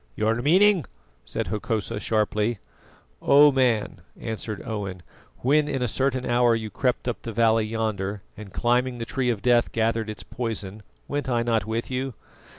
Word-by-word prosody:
"Your 110 +2 +1
meaning?" 185 - +4 0.4
said - - -3
Hokosa 110 0 -2
sharply. 110 +1 0 0.6
"O 145 +1 +7
man!" 120 -9 +1 0.2
answered 110 -2 -5
Owen, 100 -6 -4 0.4
"when 145 +4 +3
in 135 -3 -1
a - - +1
certain 130 +2 0
hour 120 -1 +3
you 110 -1 -4
crept 125 -2 -1
up 120 - -2
the 115 - -5
valley 115 -1 +3
yonder, 105 -3 -2
and 105 -2 -10
climbing 125 +3 +1
the 115 - -4
Tree 130 +1 -1
of 110 -5 -2
Death 120 -1 +3
gathered 115 -1 0
its 105 - -6
poison, 110 -4 -4 0.3
went 145 -1 -2
I 120 -2 +1
not 115 -3 0
with 115 +3 -3
you? 130 -1 -2
115 Hz, 160 wpm, -25 LUFS, 110-125 Hz, 0.6 s, O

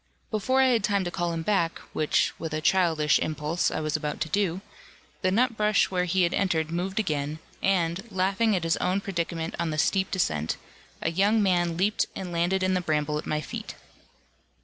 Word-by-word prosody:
Before 245 +5 +2
I 260 - +5
had 230 -4 +2
time 200 -2 +1
to 175 - -3
call 175 -1 -1
him 165 -1 -3
back, 170 -4 +1 0.2
which, 155 - +1
with 160 -2 -4
a - - -1
childish 160 -3 +3
impulse, 155 +2 -1
I - - -3
was 155 0 -1
about 150 -1 -2
to 160 - -1
do, 190 0 0 0.6
the 185 - +2
nutbush 215 -1 +2
where 180 -1 +1
he 180 +1 +2
had 170 - +1
entered 160 -5 0
moved 185 +4 -2
again, 150 -6 -1 0.2
and, 180 -2 +1
laughing 195 +3 +2
at 180 - -1
his 165 0 +1
own 185 +2 +1
predicament 170 -4 -3
on 170 -1 0
the 155 - -3
steep 190 +4 +2
descent, 80 - -1 0.5
a 160 - +1
young 205 +5 +3
man 175 -3 +1
leaped 205 +4 +1
and 185 -2 -5
landed 175 +3 +1
in 185 0 +2
the 185 - +1
bramble 150 -2 0
at - - -8
my 150 0 0
feet. - - -7
175 Hz, 195 wpm, -27 LUFS, 160-195 Hz, 0.6 s, I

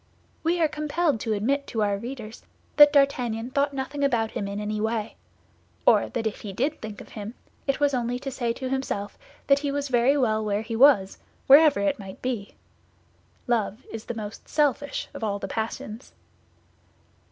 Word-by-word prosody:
We 340 +2 +1
are 320 - +4
compelled 300 -2 0
to 220 0 -1
admit 270 +7 0
to 220 -2 -1
our 205 -1 +1
readers 230 0 -7 0.4
that 295 -1 +9
D'Artagnan 250 -5 +1
thought 280 +1 +1
nothing 275 +1 -4
about 235 -5 +1
him 200 - -3
in 200 +1 -4
any 210 0 -3
way; 220 -1 -2 0.7
or - - +5
that 225 - -3
if 220 - -3
he 205 - -6
did 280 +9 -1
think 215 -2 -7
of - - -13
him, 215 +2 -7 0.3
it 275 - +1
was 285 -1 +2
only 245 -1 -1
to 270 +2 -5
say 240 -3 -1
to 260 +2 -4
himself 235 -7 -3 0.3
that 275 0 +4
he 285 -1 -2
was 285 0 -2
very 250 +3 +3
well 220 -5 +1
where 210 0 -1
he 225 +1 -4
was, 225 -7 +5 0.3
wherever 290 -1 +7
it 200 +1 0
might 195 -1 -9
be. 235 -6 -4 0.9
Love 230 -1 -1
is 225 -1 -6
the 240 - -5
most 215 -1 -8
selfish 290 -1 0
of - - -7
all 205 -2 0
the 195 - -5
passions. 220 +2 -5
240 Hz, 185 wpm, -25 LUFS, 215-280 Hz, 0.9 s, that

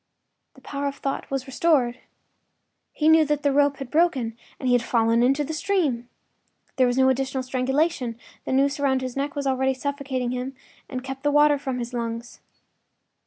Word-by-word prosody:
The - - -17
power 285 0 -3
of 280 - -3
thought 275 -1 -4
was 270 -1 -2
restored; 265 -3 +1 0.9
he 305 - 0
knew 320 0 +7
that 295 0 -1
the 285 - +3
rope 285 0 +3
had 270 -3 -7
broken 290 -9 +2 0.2
and 260 - -3
he 250 - +4
had 245 - +4
fallen 230 -1 +2
into 275 +4 +3
the 305 +3 -4
stream. 300 -9 0 0.7
There 255 -1 +4
was 245 +1 0
no 265 0 +5
additional 265 0 -1
strangulation; 260 -1 0 0.3
the - - -4
noose 275 +2 +2
about 265 -2 +2
his 255 -1 -5
neck 280 +1 -2
was 285 -1 -3
already 265 0 +1
suffocating 270 -2 -3
him 255 +2 -4 0.3
and 255 -1 -5
kept 270 0 -6
the 290 - +1
water 295 0 +4
from 265 -3 -3
his 240 0 -5
lungs. 235 0 -4
265 Hz, 185 wpm, -24 LUFS, 250-285 Hz, 0.9 s, knew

